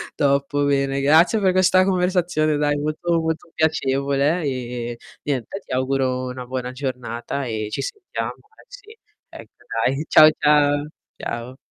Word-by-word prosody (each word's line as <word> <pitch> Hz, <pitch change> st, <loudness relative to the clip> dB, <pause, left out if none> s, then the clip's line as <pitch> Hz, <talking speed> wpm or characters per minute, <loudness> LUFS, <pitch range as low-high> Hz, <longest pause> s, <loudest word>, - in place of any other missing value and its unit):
Top 140 Hz, 0 st, +1 dB
bene, 140 Hz, -1 st, +1 dB
grazie 160 Hz, +9 st, +4 dB
per 190 Hz, -2 st, +3 dB
questa 185 Hz, 0 st, +4 dB
conversazione, 180 Hz, -5 st, +1 dB
dai, 145 Hz, 0 st, +1 dB
molto, 155 Hz, +3 st, -1 dB
molto 160 Hz, +1 st, -3 dB
piacevole 140 Hz, +1 st, +1 dB
e, 120 Hz, -3 st, -4 dB, 0.3 s
niente, 140 Hz, -, -3 dB
ti -, -, -13 dB
auguro 130 Hz, 0 st, 0 dB
una 125 Hz, 0 st, -7 dB
buona 125 Hz, 0 st, -4 dB
giornata 130 Hz, 0 st, -4 dB
e 110 Hz, -3 st, -3 dB
ci -, -, -3 dB
sentiamo. 420 Hz, -6 st, -5 dB, 0.3 s
Eh, -, -, -23 dB
sì. -, -, -14 dB, 0.3 s
Ecco -, -, -12 dB, 0.3 s
dai, 135 Hz, +4 st, 0 dB
ciao 155 Hz, 0 st, +8 dB
ciao. 145 Hz, 0 st, +3 dB, 0.3 s
Ciao. 120 Hz, +2 st, -5 dB
145 Hz, 140 wpm, -22 LUFS, 130-160 Hz, 0.3 s, ciao